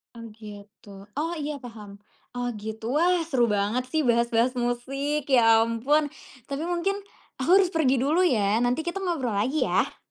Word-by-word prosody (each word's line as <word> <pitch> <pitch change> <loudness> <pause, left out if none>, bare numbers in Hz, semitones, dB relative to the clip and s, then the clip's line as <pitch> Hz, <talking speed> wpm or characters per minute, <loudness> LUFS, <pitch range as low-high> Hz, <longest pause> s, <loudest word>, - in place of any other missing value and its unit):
Oh, 230 - -9
gitu. 210 -1 -13 0.3
Oh, 330 +3 -1
iya 295 -2 -4
paham. 210 -4 -10 0.4
Oh, 245 0 -2
gitu. 220 +4 -4
Wah, 350 +2 +3
seru 255 -6 +2
banget 210 +5 0
sih 315 -1 +1
bahas-bahas 235 +1 +2
musik, 270 +4 -2
ya 225 -4 +5
ampun. 260 +7 +1 0.4
Tapi 280 +3 -4
mungkin, 355 +3 -1 0.5
aku 305 - -2
harus 370 -2 +3
pergi 275 -4 +3
dulu 310 +8 +2
ya, 215 - +2
nanti 250 +6 +1
kita 345 +3 -2
ngobrol 270 - -1
lagi 255 +10 0
ya. - - 0
250 Hz, 160 wpm, -25 LUFS, 225-300 Hz, 0.5 s, ya